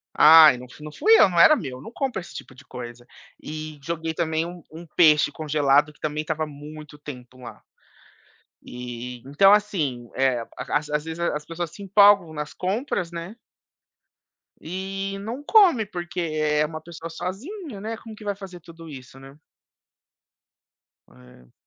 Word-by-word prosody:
Ai 155 -4 +8
não 125 0 -11
fu 150 - -14
não 150 - -8
fui 435 - +3
eu, - - +8
não 175 -2 0
era 310 - +8
meu, 130 - -6
não 225 - -10
compro 250 -6 -3
esse - - -13
tipo - - -9
de 130 +3 -16
coisa. 120 -1 -9 0.3
E 155 0 -7
joguei 165 +1 -4
também 160 0 -1
um 175 0 -9
um 165 +2 -10
peixe 155 -2 +4
congelado 150 -1 +2
que 150 - -27
também 150 0 -2
estava 155 0 -3
há 155 - -3
muito 150 +1 -11
tempo 130 -3 -11
lá. 120 -2 -11 1.1
E, 125 0 -7
então, 195 +8 +5
assim, 155 - 0
eh, 130 -3 +1
as 150 0 -2
às 150 0 -1
vezes 160 +1 -7
as 150 -3 -1
pessoas 165 0 -5
se 200 +5 -12
empolgam 200 -3 +5
nas 150 -1 -6
compras, 185 -2 -2
né 170 +6 -7 1.3
e 195 +3 -5
não 230 +7 -6
come 335 - +5
porque 175 -2 -6
é 155 -2 0
uma 155 0 -7
pessoa 165 0 -9
sozinha, 205 - -7
né, 220 +1 -5
como 225 -2 -11
que 215 - -13
vai 205 -1 -2
fazer 190 -3 -10
tudo 165 0 -13
isso, 135 -2 -11
né. 135 +1 -14 1.8
É. 125 - -19
160 Hz, 165 wpm, -24 LUFS, 145-190 Hz, 1.8 s, Ai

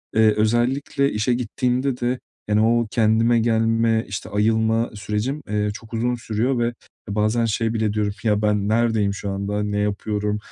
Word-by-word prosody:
Eee, 110 -1 +5
özellikle 125 +5 +1
işe 110 +4 0
gittiğimde 125 +2 -1
de, 125 +1 -1 0.3
yani, 105 0 +2
o 115 +1 +2
kendime 115 +1 +3
gelme, 115 0 +2
işte, 100 - -6
ayılma 110 +2 +1
sürecim, 105 +8 -3
eee, 105 0 0
çok 110 +2 -12
uzun 120 +2 0
sürüyor 120 +2 -1
ve 120 0 0 0.4
bazen 110 +3 +1
şey 115 +1 0
bile 110 -2 0
diyorum. 105 -1 0
"Ya, 105 -2 +2
ben 105 -1 +1
neredeyim 110 -3 +2
şu 100 0 -5
anda, 100 +1 -2
ne 105 0 -1
yapıyorum?" 105 0 -1
110 Hz, 160 wpm, -22 LUFS, 105-120 Hz, 0.4 s, Eee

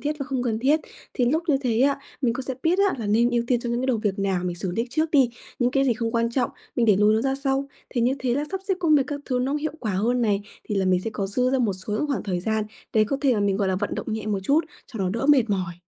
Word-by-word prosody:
thiết 300 +1 -2
và 275 - -3
không 265 -3 -2
cần 230 -3 -1
thiết, 285 +6 +3 0.3
thì 250 - +2
lúc 310 +7 +1
như 285 - +4
thế 235 -2 +1
á, 280 +1 +3 0.2
mình 245 -4 +2
cũng 260 - -3
sẽ 260 0 -4
biết 345 +3 +2
á - - -1
là 220 - -3
nên 230 +4 +3
ưu 240 -1 +1
tiên 240 -1 +1
cho 240 - -4
những 240 +1 0
cái 260 - -1
đầu 255 - +2
việc 205 -3 -2
nào 190 -2 0
mình 175 -1 -2
xử 180 +1 -3
lý 230 +5 0
trước 315 +3 0
đi, 270 -5 +4 0.3
những 245 0 +2
cái 275 +1 +2
gì 260 - +3
không 230 0 -2
quan 230 0 +1
trọng, 250 +1 0 0.3
mình 235 -2 +2
để 205 - +5
lùi 210 +2 +4
nó 220 - +2
ra 270 0 +1
sau. 275 0 -1 0.2
Thì 245 - -1
như 245 +3 +2
thế 250 -2 0
là 285 +3 0
sắp 385 0 -3
xếp 385 - +3
công 325 -3 +4
việc 275 - +3
các 290 -1 -4
thứ 255 -2 -1
nó 260 +2 0
cũng 295 - -1
hiệu 310 -1 -2
quả 215 -4 -2
hơn 235 +6 +1
này, 205 -2 +1 0.2
thì 210 - -3
là 195 - +1
mình 185 -1 +3
sẽ 225 - -4
có 195 - -2
dư 250 +6 +1
ra 265 - +2
một 225 -6 +1
số 185 +3 -7
những 215 +8 0
khoảng 280 -3 -1
thời 185 -4 -2
gian 220 +2 0 0.3
để 215 -1 +4
có 275 +6 -1
thể 270 -4 +3
mà 210 - 0
mình, 200 -1 +1
gọi 200 -1 0
là, 190 - +1
vận - - -2
động 220 - -4
nhẹ 220 -1 -4
một 205 -2 -1
chút 290 - +2 0.2
cho 225 - -9
nó 190 - 0
đỡ 230 +6 -2
mệt 265 -7 +4
mỏi. 185 -4 -1
240 Hz, 335 wpm, -24 LUFS, 210-270 Hz, 0.3 s, để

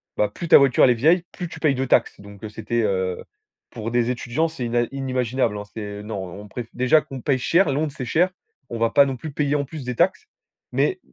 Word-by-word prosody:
ben 105 - +1
plus 170 - -7
ta - - +9
voiture, 135 -3 +4
elle 125 - +7
est - - +5
vieille, 165 +9 +3
plus 175 - -6
tu - - -9
payes 150 -4 +2
de 130 +1 -1
taxes 120 - +2
donc 100 0 -13
heu, 110 - -5
c'était, 110 +2 -2
heu, 95 -3 -1 0.5
pour 115 -1 -5
des 120 0 +1
étudiants 125 +6 -1
c'est 150 -7 -5
ina 120 +1 +1
inimaginable 130 -4 -1
hein, 105 - -5
c'est 105 -2 -6
non 105 -1 -5 0.2
on 105 - -11
préf 120 +2 -7
déjà 130 +5 +4
qu'on 135 -2 -9
paye 135 0 +1
cher 170 +6 +3
Londres 145 +1 -1
c'est 125 - -5
cher. 175 +9 +2 0.4
On 115 - -4
va 115 - +2
pas 140 +4 +5
non 135 -1 -2
plus 150 +5 -7
payer 145 0 0
en 140 -1 0
plus 150 0 -8
des 125 -1 -3
taxes 185 +5 +1 0.5
mais 375 -1 +1
125 Hz, 245 wpm, -23 LUFS, 115-145 Hz, 0.5 s, ta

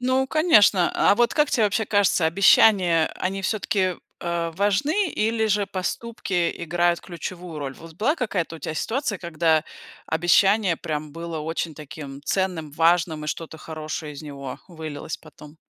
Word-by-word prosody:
Ну, 260 +1 +1
конечно. 265 - +4
А - - +4
вот 240 +1 +2
как 300 -1 +2
те 230 - +2
вообще 210 +2 +1
кажется, 200 -5 +2
обещания, 180 -1 +5
э, - - -11
они 195 +1 -3
всё-таки, 190 -3 0 0.2
э, 170 -1 -2
важны 280 - +1
или 220 -1 0
же 205 -1 +1
поступки 190 -2 -2
играют 175 +1 +1
ключевую 175 -1 -7
роль? 135 -2 -5
Вот 165 +2 -13
была 230 - +1
какая-то 185 - -2
у - - -12
тя 155 - -5
ситуация, 225 - -2
когда 160 -2 +1 0.4
обещание 180 +3 +3
прям 150 -2 -5
было 165 0 -5
очень 160 +1 -3
таким 140 -2 -9
ценным, 180 -4 -1
важным 165 0 +2
и - - -6
что-то 160 0 -5
хорошее 155 -1 -6
из 145 - -9
него 140 -3 -7
вылилось 155 -3 -6
потом? 150 +1 -15
175 Hz, 155 wpm, -24 LUFS, 160-205 Hz, 0.4 s, обещания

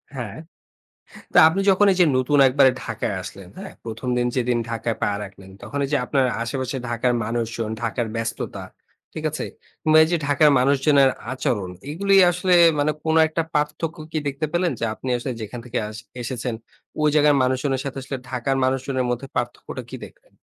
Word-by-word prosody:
হ্যা। 125 -3 -3 1.1
তো - - +6
আপনি 175 +5 -1
যখন 195 +2 +4
এই - - -2
যে, - - +8
নতুন 130 +3 +2
একবারে 130 0 +5
ঢাকায় 110 -2 -3
আসলেন, 95 0 -10
হ্যা? 195 0 -7 0.2
১ম 115 +2 -6
দিন 120 - +1
যেদিন 125 -1 +1
ঢাকায় 115 -1 -2
পা - - +2 0.2
রাখলেন 95 -1 -13
তখন 140 - -5
এই - - -2
যে, - - +4
আপনার 135 -2 +2 0.2
আশেপাশে 130 +2 -3
ঢাকার 120 +1 0
মানুষজন, 115 -1 -3
ঢাকার 115 0 -1
ব্যস্ততা। 115 0 -4 0.5
ঠিক - - -6
আছে? - - -4 0.4
কিংবা 155 0 +5
এই - - -3
যে, - - +4
ঢাকার 150 +1 +5
মানুষজনের 140 +1 +4 0.2
আচরণ, 105 -7 -2 0.2
এগুলোই 195 +4 +4
আসলে 180 +1 +1 0.2
মানে 145 +1 +2
কোন 160 0 +1
একটা 160 +1 -1
পার্থক্য 150 +3 -1
কি 155 - 0
দেখতে 140 +3 -2
পেলেন 175 0 +1
যে, 115 - 0
আপনি 130 - -7
আসলে 125 +2 -4
যেখান 120 +3 -6
থেকে 120 - -2
আস 110 0 -9 0.2
এসেছেন 125 0 -3 0.5
ওই 150 - +4
জায়গার 150 -1 +5
মানুষজনের 130 +1 0
সাথে 135 -1 -5
আসলে 135 +1 -5
ঢাকার 130 +1 -1
মানুষজনের 130 0 0
মধ্যে 125 +2 -3
পার্থক্যটা 120 0 -4
কি - - -6
দেখলেন? - - -22
130 Hz, 180 wpm, -22 LUFS, 120-150 Hz, 1.1 s, যে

